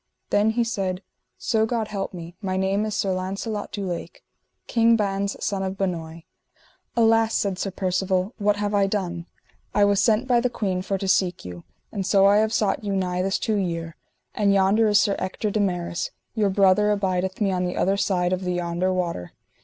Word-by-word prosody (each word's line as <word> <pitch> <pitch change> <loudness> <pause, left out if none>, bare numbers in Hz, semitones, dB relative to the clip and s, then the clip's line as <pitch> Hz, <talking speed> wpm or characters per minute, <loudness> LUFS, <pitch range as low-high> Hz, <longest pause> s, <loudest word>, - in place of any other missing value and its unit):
Then 205 +2 +3
he 235 +2 +1
said: 195 -5 -2 0.3
So 220 -1 +1
God 230 -1 -1
me - - -14
help, 195 -2 -3 0.3
my 190 -2 -2
name 195 +2 +1
is 215 - -3
Sir 195 -1 0
Launcelot 195 +3 -4
du 200 -1 -4
Lake, 180 - -6 0.4
King 230 0 +4
Ban's 200 -2 -1
son 200 -2 -1
of 190 0 -3
Benoy. 165 -4 -3 0.7
Alas, 225 -1 +4
said 195 -2 -1
Sir 195 - -1
Percivale, 185 +2 -1
what 205 0 +2
have 205 0 -2
I 200 -1 +3
done? 175 -4 -3 0.5
I 205 - +5
was 200 -1 +3
sent 220 +5 +2
by 245 -2 +4
the 250 +1 +1
queen 190 -6 -2
for 195 +1 -2
to 195 - -4
seek 180 - +1
you, 90 -1 -9 0.3
and 200 -3 -3
so 195 +1 +4
I 200 +1 +6
have 220 0 +2
sought 215 -1 0
you 200 -1 -1
nigh 180 -1 -1
this 190 +1 0
two 215 -2 -1
year, 165 -4 -3 0.4
and 205 -2 +2
yonder 200 +3 +4
is 205 -1 +5
Sir 200 -1 +2
Ector 190 +3 -2
de 215 - 0
Maris, 175 -3 -1 0.2
your 210 -3 +1
brother 195 +1 +4
abideth 190 -2 -1
me 200 -3 +1
on 180 -1 0
the 180 - -3
other 195 +1 +2
side 180 -3 +1
of 185 - -1
the 180 0 -1
yonder 175 +1 -1
water. 170 - -3
195 Hz, 200 wpm, -24 LUFS, 185-210 Hz, 0.7 s, I